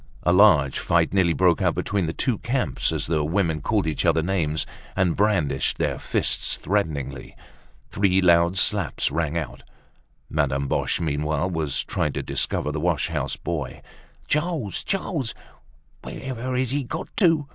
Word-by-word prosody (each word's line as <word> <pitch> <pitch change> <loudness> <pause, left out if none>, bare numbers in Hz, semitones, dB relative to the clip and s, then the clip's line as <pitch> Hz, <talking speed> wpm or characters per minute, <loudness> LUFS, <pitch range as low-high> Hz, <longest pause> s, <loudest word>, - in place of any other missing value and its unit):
A 85 - +3
large 90 -9 +5
fight 85 0 +1
nearly 95 -3 +3
broke 90 -2 +3
out - - +2
between 95 -4 -1
the - - -1
two 120 +6 -1
camps 130 +2 0
as - - -2
the 80 -2 0
women 80 -1 0
called 105 +3 0
each 80 -2 -1
other 80 -2 +3
names 80 -4 0 0.3
and 90 -3 +2
brandished 95 -10 +1
their - - -1
fists - - 0
threateningly. 75 -9 -2 0.6
Three 95 -1 +2
loud 85 0 +4
slaps 100 -3 +1
rang 80 -1 -1
out. 80 - -5 0.7
Madame 70 -2 0
Boche, - - 0
meanwhile, 75 +2 -1
was 80 -5 -1
trying - - -1
to - - -3
discover 75 - -1
the 75 - -3
wash 85 -3 0
house - - -2
boy. 75 -7 -4 0.5
"Charles! 150 - -1
Charles! 165 - -2 0.7
Wherever 130 -1 -4
has 130 -1 0
he 145 0 0
got 165 +9 -6
to?" 165 -7 +3
85 Hz, 155 wpm, -24 LUFS, 75-105 Hz, 0.7 s, large